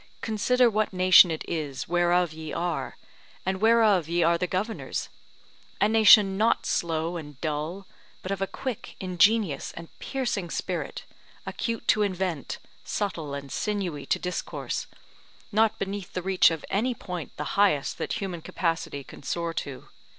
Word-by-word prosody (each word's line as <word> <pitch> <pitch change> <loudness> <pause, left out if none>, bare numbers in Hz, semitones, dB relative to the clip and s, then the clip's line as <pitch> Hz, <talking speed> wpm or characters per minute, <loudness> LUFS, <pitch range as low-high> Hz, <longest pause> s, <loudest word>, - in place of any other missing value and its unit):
consider 245 +3 +3
what 215 -1 +1
nation 185 -1 +7
it 160 -1 -3
is 150 -5 -3
whereof 175 -1 +2
ye 160 0 -7
are, 175 +1 -3 0.5
and 190 0 -1
whereof 220 -7 +4
ye 170 0 +2
are 170 +1 +4
the 180 +2 -1
governors: 200 +6 -3 0.7
a 205 - +4
nation 210 -3 +6
not 225 +2 +2
slow 165 +1 -1
and 150 -4 -9
dull, 160 +5 -3 0.4
but 185 - -4
of 195 -1 -2
a 195 - +1
quick, 260 -1 -6
ingenious 185 -3 +2
and 165 0 -9
piercing 240 -9 -2
spirit, - - -4 0.4
acute 230 -1 -3
to 215 - +4
invent, 185 -6 -2 0.3
subtle 165 -8 -3
and 140 -1 -7
sinewy 190 -9 -2
to - - 0
discourse, 180 0 -4 0.6
not 220 +1 +3
beneath 195 -1 -5
the 180 - -3
reach 190 0 +5
of 165 -2 -4
any 240 +5 +1
point 180 -6 -7
the 150 - -4
highest 195 -9 +2
that - - -2
human 185 -4 -4
capacity 165 -5 -2
can - - -13
soar 170 +3 -2
to. 140 -5 -6
180 Hz, 150 wpm, -27 LUFS, 165-205 Hz, 0.7 s, nation